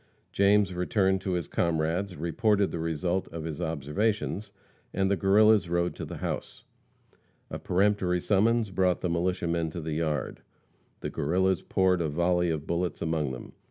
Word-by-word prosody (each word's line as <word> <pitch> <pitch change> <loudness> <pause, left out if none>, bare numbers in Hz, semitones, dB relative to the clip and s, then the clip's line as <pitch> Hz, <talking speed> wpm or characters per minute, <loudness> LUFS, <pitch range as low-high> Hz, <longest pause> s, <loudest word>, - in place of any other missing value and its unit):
James 100 -1 +3
returned 95 +1 +1
to 95 -1 -2
his 85 -3 -2
comrades, 85 +3 -1
reported 100 +5 +1
the 85 - -4
result 85 +3 -1
of 80 -1 -7
his 80 -3 -5
observations, 100 - -1 0.5
and 95 0 +1
the - - +4
Guerrillas 100 +1 +4
rode 85 0 0
to - - -6
the - - -7
house. - - -5 0.9
A - - -4
peremptory 95 -1 +1
summons 110 +3 +2
brought 90 -2 +1
the 90 - -1
militiamen 85 -1 0
to 85 - -6
the 80 -1 -4
yard. 80 -1 -2 0.6
The - - -4
Guerrillas 95 +4 +1
poured 95 -2 +1
a 80 - 0
volley 90 +3 +1
of 80 -2 -2
bullets 85 +1 -2
among 80 -4 -1
them. 60 - -9
90 Hz, 160 wpm, -28 LUFS, 80-95 Hz, 0.9 s, the